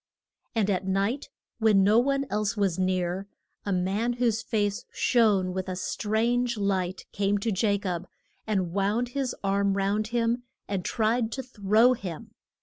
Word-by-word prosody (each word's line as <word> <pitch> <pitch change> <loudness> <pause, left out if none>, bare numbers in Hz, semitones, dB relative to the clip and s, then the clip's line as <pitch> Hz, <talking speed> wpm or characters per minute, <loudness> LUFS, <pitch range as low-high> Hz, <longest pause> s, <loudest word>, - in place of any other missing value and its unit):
And 220 -3 +2
at 190 0 -1
night, 200 +8 0 0.3
when 215 -3 +5
no 210 +4 +5
one 275 +2 +1
else 210 +1 0
was 190 -3 +1
near, 185 +1 0 0.4
a - - 0
man 195 +6 0
whose 235 -2 +1
face 205 -4 -1
shone 205 -6 +2
with 185 0 -3
a 185 - -3
strange 235 +5 0
light, 190 -2 -1
came 200 +1 +1
to 215 +2 -1
Ja 200 +1 +2
cob 185 -3 -4 0.4
and 190 -5 0
wound 205 +5 +1
his 265 0 -2
arms 200 0 +1
round 200 +2 0
him 235 +1 0 0.3
and 195 -3 -2
tried 225 +2 0
to 265 - -4
throw 225 0 +3
him. 180 -9 -7
205 Hz, 155 wpm, -27 LUFS, 190-230 Hz, 0.4 s, when